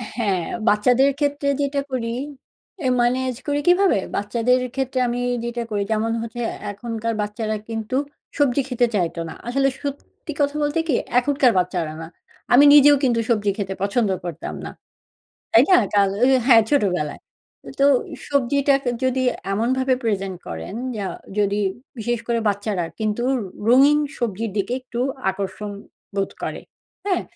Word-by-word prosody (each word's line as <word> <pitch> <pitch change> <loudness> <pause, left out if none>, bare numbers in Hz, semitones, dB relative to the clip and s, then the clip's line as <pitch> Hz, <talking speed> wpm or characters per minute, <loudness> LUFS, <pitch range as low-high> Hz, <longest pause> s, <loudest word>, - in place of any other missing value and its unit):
হ্যাঁ, 200 -7 0 0.2
বাচ্চাদের 250 +6 +4
ক্ষেত্রে 285 -1 0
যেটা 280 0 0
করি 230 -2 -2 0.7
এ - - +3
ম্যানেজ 255 +1 +1
করি 290 0 +1
কিভাবে? 360 - +4 0.2
বাচ্চাদের 235 +5 +1
ক্ষেত্রে 265 -1 -1
আমি 240 +1 -2 0.2
যেটা 235 0 -3
করি 205 -1 0
যেমন 220 +1 0
হচ্ছে 230 +1 -6 0.3
এখনকার 230 +1 -4
বাচ্চারা 215 +1 -3
কিন্তু 225 +2 -3 0.4
সবজি 280 -2 +3
খেতে 245 -1 +2
চাইত 175 -4 0
না। - - -7
আসলে 275 +3 +2
সত্যি 285 +2 -7
কথা 285 0 +1
বলতে 295 +2 0
কি? 270 - +2 0.2
এখনকার 275 -1 +3
বাচ্চারা 175 -3 -2
না। 165 - -7 0.5
আমি 270 +4 +8
নিজেও 290 0 +8
কিন্তু 240 -3 +2
সবজি 210 -3 +2
খেতে 195 -2 -3
পছন্দ 210 +1 +1 0.2
করতাম 170 -4 -5
না। - - -6 0.8
তাই - - +7
না? 370 - +8 0.2
কাল 200 -1 +4
আ - - +8 0.2
হ্যাঁ 230 -4 +7
ছোটবেলায়। 180 - 0 0.6
তো - - +5 0.4
সবজিটাকে 280 -1 +2
যদি 260 0 +1 0.3
এমনভাবে 260 +5 +1
present 195 -4 -1
করেন 80 - -6 0.2
যা 200 -2 -3 0.3
যদি 205 0 +1 0.4
বিশেষ 240 +2 -1
করে 235 -1 +1
বাচ্চারা 205 -3 -1
কিন্তু 220 +2 -1 0.4
রঙিন 275 +5 +6 0.2
সবজির 225 -2 -2
দিকে 200 +4 -1
একটু 245 -1 -6 0.3
আকর্ষণ 200 +2 -5 0.5
বোধ 195 - 0
করে। - - -4 0.5
হ্যাঁ? 375 -3 +1
235 Hz, 145 wpm, -22 LUFS, 205-270 Hz, 0.8 s, আমি